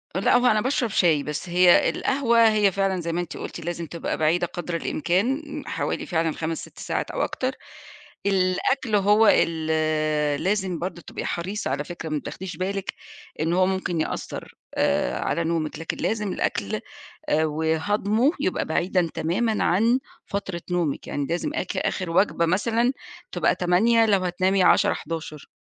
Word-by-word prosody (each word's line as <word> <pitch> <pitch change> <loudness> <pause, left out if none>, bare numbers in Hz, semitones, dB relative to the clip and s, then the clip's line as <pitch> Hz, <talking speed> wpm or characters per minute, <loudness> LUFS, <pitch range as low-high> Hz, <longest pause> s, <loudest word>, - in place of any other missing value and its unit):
لأ، - - +3
هو 250 - +1
أنا 215 -3 +4
باشرب 255 -2 0
شاي 160 -7 +3
بس 150 +4 -5
هي 180 0 +5
القهوة 235 -4 +3
هي 210 -2 +3
فعلًا 195 -1 0
زي 170 0 -3
ما 175 - 0
أنتِ 175 - -7
قُلتِ - - -6
لازم 170 -1 -4
تبقى 165 +1 -4
بعيدة 170 +3 +2
قدر 175 0 -5
الإمكان، 190 - 0 0.2
حوالي - - -2
فعلًا 165 -2 0
5 160 +1 -3
6 - - -16
ساعات - - -3
أو - - -2
أكتر، 255 0 -1 0.7
الأكل 200 +5 +1
هو 210 +2 +5
ال 160 -1 +1 0.8
لازم 190 -3 0
برضه 175 +1 -5
تبقي - - -7
حريصة 185 -2 -3
على 145 +2 -1
فكرة 165 0 -7
ما 155 - -1
بتاخديش 185 +5 -7
بالك 195 +1 -3 0.5
إن 165 +2 +1
هو 185 +1 +4
ممكن 185 -3 -1
يأثّر، - - -5 0.2
آآ، 60 0 +1
على 170 - -1
نومِك 160 -2 -2
لكن 165 - -4
لازم 210 -3 -1
الأكل، - - -1 0.5
آآ، 155 +1 +3
وهضمُه 180 - +1
يبقى 185 - 0
بعيدًا 175 +1 +1
تمامًا 215 +7 0
عن 230 +8 +3 0.3
فترة 190 -3 -4
نومِك، 175 -5 -1
يعني 145 -1 -2
لازم 170 - -2
اك - - -3
آخِر 185 -3 -1
وجبة 170 -1 +2
مثلًا، 230 +7 +1 0.4
تبقى - - +2
20:00 225 +6 +3
لو 200 -3 +3
هتنامي 185 +2 +2
22:00 - - +5
23:00. 160 -3 -6
180 Hz, 160 wpm, -24 LUFS, 165-210 Hz, 0.8 s, هي